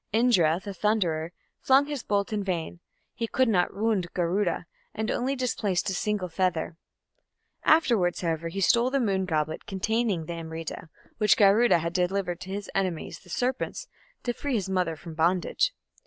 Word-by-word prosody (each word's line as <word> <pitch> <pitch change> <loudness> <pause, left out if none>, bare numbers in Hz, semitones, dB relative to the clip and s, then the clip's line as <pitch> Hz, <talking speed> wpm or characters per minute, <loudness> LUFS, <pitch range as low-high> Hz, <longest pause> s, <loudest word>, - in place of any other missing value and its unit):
Indra, 195 -8 +3
the 200 +1 -7
thunderer, 175 -6 0 0.3
flung 270 +2 +4
his 290 -3 -4
bolt 205 0 -1
in 205 -1 -1
vain; 175 -3 -3 0.3
he 230 -2 -3
could 260 +3 +2
not 180 -5 +1
wound 200 -4 0
Garuda, 175 0 0 0.3
and 220 +1 -1
only 260 +3 0
displaced 210 -7 -1
a - - -2
single 205 0 -1
feather. 175 -2 -1 0.9
Afterwards, 230 - +3
however, 165 -1 -1
he 195 +4 -4
stole 235 +6 +4
the 275 +1 +1
moon 195 -6 +1
goblet 155 -2 -2
containing 205 -2 0
the 170 - -5
Amrita, 165 0 -6 0.3
which 210 -2 +4
Garuda 210 +2 +5
had 170 +1 -3
delivered 180 -1 0
to 185 - -9
his 200 +1 -4
enemies, 185 -4 -2
the 180 - -19
serpents, 255 - -2 0.4
to 240 - -1
free 280 +1 -2
his 200 -4 -1
mother 180 -3 0
from 160 +2 -10
bondage. 175 - +1
190 Hz, 165 wpm, -27 LUFS, 170-225 Hz, 0.9 s, Garuda